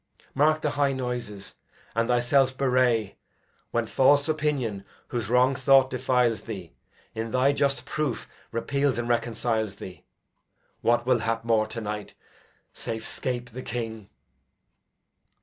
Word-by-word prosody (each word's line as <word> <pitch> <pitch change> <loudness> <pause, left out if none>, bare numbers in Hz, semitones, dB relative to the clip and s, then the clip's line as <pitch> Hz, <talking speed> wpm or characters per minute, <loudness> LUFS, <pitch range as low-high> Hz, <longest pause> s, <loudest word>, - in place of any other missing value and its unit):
Mark 155 +3 +3
the 150 - 0
high 145 -1 +1
noises, 120 -6 -4 0.4
and 115 +1 +1
thyself 130 +2 +3
bewray 125 -5 +2 0.5
When 115 -1 0
false 140 +5 +4
opinion, 145 -10 -1 0.3
whose 120 -4 -3
wrong 125 +2 +4
thought 135 0 +4
defiles 125 -3 +1
thee, 95 -7 -8 0.4
In 115 +1 -3
thy 130 +4 +3
just 140 -3 0
proof 150 -5 -2 0.2
repeals 140 +2 0
and 120 0 -2
reconciles 115 -3 0
thee. 95 -2 -10 0.8
What 120 +1 +2
will 125 -1 +3
hap 115 +1 -2
more 110 -2 +2
to 115 +1 -6
night, 105 -1 -5 0.6
safe 115 0 -4
scape 125 -1 -3
the 130 +3 -7
King! 110 -4 -5
120 Hz, 130 wpm, -26 LUFS, 115-130 Hz, 0.8 s, false